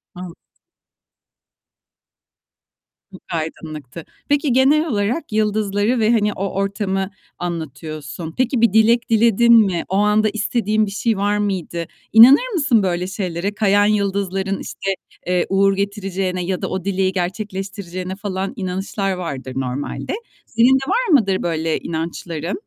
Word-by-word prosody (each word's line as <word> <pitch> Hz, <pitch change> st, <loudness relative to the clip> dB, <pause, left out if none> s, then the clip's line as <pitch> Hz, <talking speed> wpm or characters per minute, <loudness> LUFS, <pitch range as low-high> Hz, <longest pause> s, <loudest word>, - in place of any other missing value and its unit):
An 180 Hz, -1 st, -8 dB, 2.8 s
Çok 185 Hz, -, -13 dB
aydınlıktı. 155 Hz, -2 st, -6 dB, 0.2 s
Peki, 290 Hz, -1 st, +2 dB
genel 290 Hz, +5 st, +4 dB
olarak 225 Hz, +5 st, -1 dB
yıldızları 210 Hz, +2 st, +1 dB
ve 220 Hz, +1 st, +3 dB
hani 210 Hz, -3 st, +2 dB
o 195 Hz, 0 st, -3 dB
ortamı 195 Hz, -1 st, -1 dB, 0.3 s
anlatıyorsun. 160 Hz, -1 st, -6 dB
Peki 255 Hz, -1 st, +1 dB
bir 230 Hz, -4 st, +4 dB
dilek 230 Hz, +2 st, +4 dB
diledin 235 Hz, +1 st, +4 dB
mi? 175 Hz, -3 st, -1 dB
O 190 Hz, -, -1 dB
anda 210 Hz, +1 st, +3 dB
istediğin 215 Hz, 0 st, 0 dB
bir 200 Hz, -, -6 dB
şey 215 Hz, +1 st, 0 dB
var 205 Hz, +1 st, +1 dB
mıydı? 180 Hz, -5 st, -2 dB, 0.3 s
İnanır 275 Hz, -, +7 dB
mısın 275 Hz, -, +3 dB
böyle 180 Hz, 0 st, -1 dB
şeylere? 190 Hz, 0 st, -3 dB
Kayan 205 Hz, -1 st, +3 dB
yıldızların 195 Hz, -2 st, 0 dB
işte, 195 Hz, -, -4 dB, 0.4 s
eee, 180 Hz, -1 st, +1 dB
uğur 195 Hz, 0 st, +3 dB
getireceğine 195 Hz, -2 st, -2 dB
ya 185 Hz, 0 st, -2 dB
da -, -, -2 dB
o 185 Hz, 0 st, -4 dB
dileği 190 Hz, -1 st, +1 dB
gerçekleştireceğine 190 Hz, -1 st, -4 dB
falan 195 Hz, -1 st, -4 dB
inanışlar 195 Hz, 0 st, -3 dB
vardır 140 Hz, -8 st, -5 dB
normalde. 135 Hz, -, -3 dB, 0.3 s
Senin 235 Hz, +3 st, +3 dB
de 270 Hz, 0 st, -1 dB
var -, -, +1 dB
mıdır 195 Hz, -3 st, -1 dB
böyle 160 Hz, -1 st, -1 dB
inançların? 165 Hz, 0 st, -4 dB
195 Hz, 130 wpm, -20 LUFS, 180-215 Hz, 2.8 s, İnanır